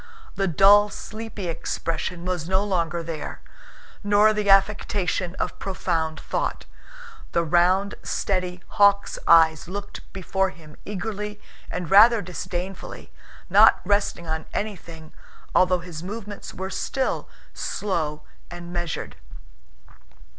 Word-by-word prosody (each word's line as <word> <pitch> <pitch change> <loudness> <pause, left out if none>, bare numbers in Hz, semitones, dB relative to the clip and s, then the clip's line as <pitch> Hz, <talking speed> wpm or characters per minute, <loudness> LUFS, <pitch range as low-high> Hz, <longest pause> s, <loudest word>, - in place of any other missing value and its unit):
The 195 - 0
dull, 200 +5 +6
sleepy 215 -2 -7
expression 170 +1 -3
was 180 -2 -3
no 190 +1 +2
longer 170 -4 -1
there, 160 -2 -6 0.6
nor 205 +1 +5
the 210 -1 -1
affectation 195 -2 +2
of - - -3
profound 165 -4 -2
thought. - - -3 0.7
The 170 - +2
round, 180 +5 +3
steady, 180 -2 -2
hawk's 200 0 +3
eyes 160 -2 +5
looked 200 +3 -8
before 190 0 -1
him 155 -4 -14
eagerly 210 +1 -5 0.3
and 180 -3 -5
rather 225 +4 +8
disdainfully, 180 +1 -6 0.4
not - - +6
resting 200 -4 0
on 160 0 -4
anything 165 -6 -6 0.4
although 180 -1 +3
his 165 -3 -8
movements 205 +2 -7
were 190 +1 -6
still 265 +7 -2 0.2
slow 155 -7 -2 0.3
and 175 0 -8
measured. 175 -2 -4
185 Hz, 110 wpm, -24 LUFS, 170-205 Hz, 0.7 s, rather